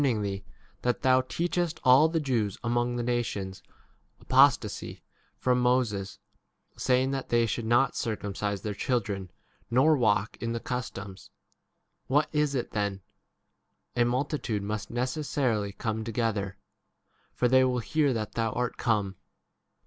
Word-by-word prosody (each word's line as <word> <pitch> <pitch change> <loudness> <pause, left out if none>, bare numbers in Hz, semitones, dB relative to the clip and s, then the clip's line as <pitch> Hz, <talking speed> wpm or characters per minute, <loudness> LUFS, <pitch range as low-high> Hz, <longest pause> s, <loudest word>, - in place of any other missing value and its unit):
ing 115 -6 +1
thee 100 -1 -3 0.4
that 125 +3 -1
thou 130 -1 +5
teachest 170 +4 -2
all 135 +4 +6
the 165 0 0
Jews 115 -9 -1
among 120 0 0
the 120 - -1
nations 115 -6 -2 0.6
apostasy - - +2 0.3
from 125 -1 +2
Moses, 120 -6 +1 0.6
saying 130 +1 +2
that 135 -1 -3
they 120 0 +3
should 115 +1 -2
not 120 +4 +3
circumcise 100 -2 -3
their 105 - -2
chil 125 +4 +1
dren, 100 -3 -5 0.4
nor 135 +6 +5
walk 105 -5 +1
in 115 0 -2
the 115 - -2
customs. 100 -6 -6 0.8
22 - - -5
What 150 - +3
is 150 -2 +1
it 125 - -2
then? 100 -3 -2 0.9
a 120 - +4
multitude 120 -3 -1
must 105 +1 -4
necessarily 125 -4 -1
come 110 +2 -3
together; 110 -4 -2 0.8
for 125 - +2
they 130 +1 +5
will 130 -1 +1
hear 145 +4 +1
that 110 -4 -2
thou 115 -2 -1
art 125 0 -2
23 - - -7
come. 105 -5 +1
120 Hz, 145 wpm, -28 LUFS, 105-130 Hz, 0.9 s, all